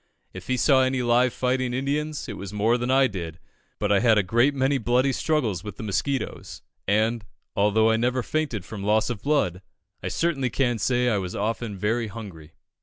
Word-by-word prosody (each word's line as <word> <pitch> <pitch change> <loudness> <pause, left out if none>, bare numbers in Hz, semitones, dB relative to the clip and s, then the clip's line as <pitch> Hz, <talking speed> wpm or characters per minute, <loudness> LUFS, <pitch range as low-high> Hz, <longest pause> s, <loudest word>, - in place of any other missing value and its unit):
If 95 0 -9
he 130 - 0
saw 135 0 +4
any 130 -1 +1
live 120 +1 +3
fighting 125 0 -1
Indians, 145 +3 -2
it - - -5
was 100 -1 -7
more 105 +3 +2
than 120 0 -2
I 135 +1 +5
did; 85 -8 -5 0.4
but 105 -1 -1
I 100 - +5
had 115 -1 +4
a 105 - +3
great 120 +9 +2
many 135 +1 +1
bloody 125 +3 +2
struggles 120 - -1
with 105 - -8
the - - -7
mosquitoes, 130 +6 -3 0.2
and, 110 +3 +1 0.3
although 105 +2 +3
I 110 - +2
never 125 +2 0
fainted 140 - -2
from 105 -3 -7
loss 110 +3 +2
of 110 -5 -6
blood, 140 - 0 0.4
I - - -4
certainly 145 -7 0
can 120 -4 0
say 125 +4 +1
I 110 -4 +2
was 90 -2 -5
often 110 0 -2
very 110 +4 0
hungry." 95 -8 -10
120 Hz, 195 wpm, -25 LUFS, 105-130 Hz, 0.4 s, I